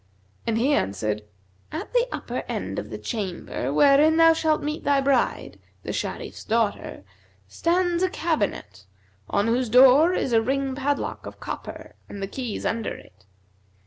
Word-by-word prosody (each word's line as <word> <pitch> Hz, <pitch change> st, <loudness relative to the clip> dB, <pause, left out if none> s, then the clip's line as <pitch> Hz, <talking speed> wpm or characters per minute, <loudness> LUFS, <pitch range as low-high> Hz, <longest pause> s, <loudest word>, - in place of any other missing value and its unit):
and 225 Hz, -1 st, +1 dB
he 265 Hz, +6 st, +2 dB
answered, 105 Hz, -, -1 dB, 0.5 s
'At 330 Hz, +10 st, -6 dB
the -, -, +3 dB
upper -, -, -4 dB
end -, -, -3 dB
of -, -, -7 dB
the -, -, -6 dB
chamber 185 Hz, -, -4 dB
wherein 290 Hz, -, +5 dB
thou 330 Hz, 0 st, +7 dB
shalt 315 Hz, -1 st, 0 dB
meet 300 Hz, +1 st, -3 dB
thy 285 Hz, -1 st, +3 dB
bride, 270 Hz, -2 st, 0 dB, 0.2 s
the -, -, -4 dB
Sharif's -, -, -5 dB
daughter, 220 Hz, -, -1 dB, 0.4 s
stands 345 Hz, -, 0 dB
a 370 Hz, -, +2 dB
cabinet, 205 Hz, -, -2 dB, 0.4 s
on 200 Hz, -, +1 dB
whose 240 Hz, +1 st, +1 dB
door 265 Hz, +8 st, +7 dB
is 260 Hz, -, -1 dB
a 225 Hz, -, +5 dB
ring 270 Hz, +3 st, -1 dB
padlock 285 Hz, +2 st, -2 dB
of -, -, -10 dB
copper -, -, -7 dB, 0.2 s
and 200 Hz, -, -8 dB
the 195 Hz, -, -2 dB
keys 245 Hz, +1 st, -5 dB
under 225 Hz, -1 st, -2 dB
it. 95 Hz, +1 st, -17 dB
265 Hz, 155 wpm, -24 LUFS, 210-310 Hz, 0.5 s, thou